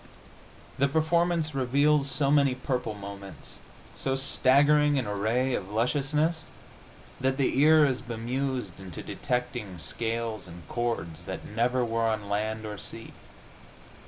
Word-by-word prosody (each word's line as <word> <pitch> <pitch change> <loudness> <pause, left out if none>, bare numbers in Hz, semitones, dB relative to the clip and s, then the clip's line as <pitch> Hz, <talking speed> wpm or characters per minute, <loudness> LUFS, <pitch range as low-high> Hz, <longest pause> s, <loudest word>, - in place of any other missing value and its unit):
The 140 - +4
performance 160 +1 +1
reveals 140 +2 +2
so 135 +1 +1
many 140 -3 +4
purple 125 -4 -3
moments, 100 -1 -9 0.4
so 135 0 -1
staggering 145 +2 +4
an 130 - 0
array 110 +6 0
of 100 -5 -3
lusciousness, 145 +8 0 0.7
that 130 +1 0
the 135 -1 +1
ear 155 +1 +6
is 130 -3 0
bemused 120 -3 -3
into 95 -4 -8
detecting 125 -6 -3
scales 115 +3 -2
and 85 -1 -12
chords 90 -9 -3
that 95 - -6
never 120 +3 0
were 115 0 0
on 110 -2 -2
land 110 +2 -2
or 105 -2 -6
sea. - - -7
125 Hz, 130 wpm, -28 LUFS, 110-140 Hz, 0.7 s, ear